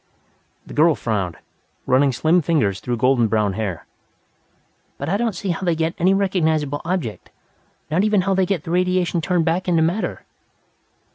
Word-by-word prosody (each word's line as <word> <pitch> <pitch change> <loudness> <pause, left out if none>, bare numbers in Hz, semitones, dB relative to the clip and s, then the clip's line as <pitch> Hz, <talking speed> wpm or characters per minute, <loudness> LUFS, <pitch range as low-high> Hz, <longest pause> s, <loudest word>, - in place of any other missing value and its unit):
The - - -11
girl 155 +1 +4
frowned, 100 -7 -2 0.5
running 135 +2 +3
slim 160 +8 +2
fingers 140 - 0
through 120 -1 -3
golden 125 0 +3
brown 105 -2 +1
hair. 95 -7 -4 1.1
"But 140 - -4
I 195 - +1
don't 225 -1 -1
see 190 +2 -4
how 170 - -4
they 175 -3 +1
get 160 +1 -1
any 180 +2 +3
recognizable 160 -7 0
object, 165 - -3 0.6
not 175 +5 +2
even 210 -2 +3
how 195 +1 0
they 190 -1 +1
get 180 -6 -1
the 165 - -6
radiation 180 -1 +1
turned 175 0 0
back 175 +3 0
into 165 -3 +3
matter." 175 +7 -2
165 Hz, 165 wpm, -21 LUFS, 130-180 Hz, 1.1 s, girl